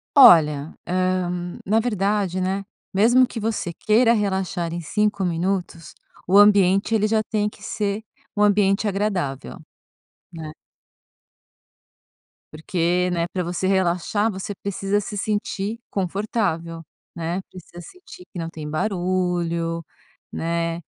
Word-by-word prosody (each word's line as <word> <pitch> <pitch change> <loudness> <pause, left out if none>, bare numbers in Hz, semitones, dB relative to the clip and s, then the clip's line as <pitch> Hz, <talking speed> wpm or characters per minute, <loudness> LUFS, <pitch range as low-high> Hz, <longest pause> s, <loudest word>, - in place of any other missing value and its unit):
Olha, 155 - +7
eh, 185 0 0 0.4
na 215 +3 +3
verdade, 200 -4 0
né, 190 +2 -1 0.3
mesmo 240 +6 +5
que 225 - -6
você 210 -5 -2
queira 230 +5 +3
relaxar 190 -5 -1
em 170 - -4
5 210 +4 0
minutos, 175 -1 -2 0.3
o 195 +2 +5
ambiente, 200 +1 +5
ele 215 0 +2
já 220 0 +2
tem 210 -1 -1
que - - -19
ser 205 0 -2 0.3
um 205 - 0
ambiente 205 0 +3
agradável, 195 -9 -2 0.8
né? 160 -2 -7 2.0
Porque, 175 +3 0
né, 170 -1 0
pra 180 -2 -1
você 175 +2 -2
relaxar, 190 +3 +1
você 195 +1 -5
precisa 200 +1 -1
se 205 +1 -6
sentir 210 +1 -2
confortável, 185 -4 -2 0.3
né, 170 +3 -3
precisa 175 -1 -11
sentir 365 - -14
que 180 - -7
não 165 0 -4
tem 155 -2 -7
barulho, 175 -2 -1 0.5
né, 165 0 -2
190 Hz, 120 wpm, -22 LUFS, 170-210 Hz, 2.0 s, Olha